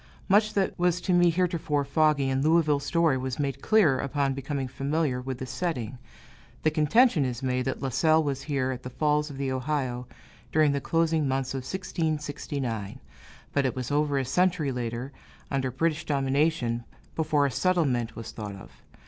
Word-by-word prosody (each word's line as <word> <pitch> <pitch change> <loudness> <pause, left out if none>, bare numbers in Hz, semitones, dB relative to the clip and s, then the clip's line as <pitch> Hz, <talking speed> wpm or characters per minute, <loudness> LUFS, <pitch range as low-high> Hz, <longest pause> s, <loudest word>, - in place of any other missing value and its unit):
Much 210 +2 +3
that 195 -2 +1
was 180 0 +2
to 180 - 0
me 175 0 +5
heretofore 165 -4 0
foggy 150 -1 +2
in 135 0 0
Louisville 155 -1 +3
story 155 -1 +1
was 130 -1 -3
made 140 -2 -2
clear, 185 -12 +4
upon 140 0 0
becoming 135 0 -3
familiar 135 +1 -1
with 130 0 -4
the 130 - -5
setting. 125 -5 -3 0.6
The 155 - +3
contention 160 - +4
is 125 0 -3
made 125 -1 0
that 135 +1 -3
La 135 - 0
Salle 160 +4 +3
was 140 -2 -2
here 135 -3 -1
at 125 -1 -5
the 125 - -7
Falls 150 +3 +1
of 140 - -8
the 135 -1 -2
Ohio, 130 -2 -2 0.4
during 155 -2 +4
the 140 0 -1
closing 165 -1 +1
months 135 0 -1
of - - -2
1669; 145 - -3 0.5
but 140 - +2
it 130 - -1
was 130 +1 -4
over 145 -1 +1
a 135 - 0
century 180 -1 +1
later, 120 +1 -4 0.4
under 135 -2 0
British 160 +5 -1
domination, 135 -4 0 0.3
before 150 -2 +2
a 140 - 0
settlement 135 -7 +1
was 115 - -7
thought 105 -3 -6
of. 95 - -12
140 Hz, 175 wpm, -27 LUFS, 130-160 Hz, 0.6 s, me